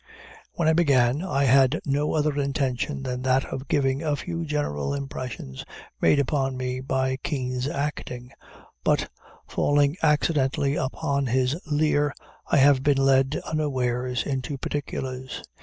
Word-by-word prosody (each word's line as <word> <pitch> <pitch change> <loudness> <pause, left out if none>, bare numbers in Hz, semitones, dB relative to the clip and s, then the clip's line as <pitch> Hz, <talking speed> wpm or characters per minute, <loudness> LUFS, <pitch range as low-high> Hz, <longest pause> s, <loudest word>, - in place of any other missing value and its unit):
When 170 - 0
I 160 - +5
began, 140 -4 +3
I 160 -7 0
had 135 +2 +4
no 145 +2 0
other 150 -1 +1
intention 140 0 -1
than 125 -1 -3
that 130 +1 +2
of 135 +1 -5
giving 135 0 +1
a 150 -3 0
few 170 +2 -4
general 145 - -2
impressions 130 - -6 0.4
made - - +5
upon 135 -1 0
me 130 0 -3
by 130 0 -1
Kean's 130 -3 -2
acting; 140 -4 -4 0.5
but, - - +1 0.4
falling 145 +1 +2
accidentally 145 -2 +2
upon 140 0 -1
his 130 +3 +1
Lear, 145 -1 +1 0.3
I - - +2
have 140 -1 +5
been 140 0 +3
led, 135 +1 +3
unawares, 125 -5 -1
into 135 0 -3
particulars. 130 -2 -4
135 Hz, 135 wpm, -25 LUFS, 130-145 Hz, 0.5 s, I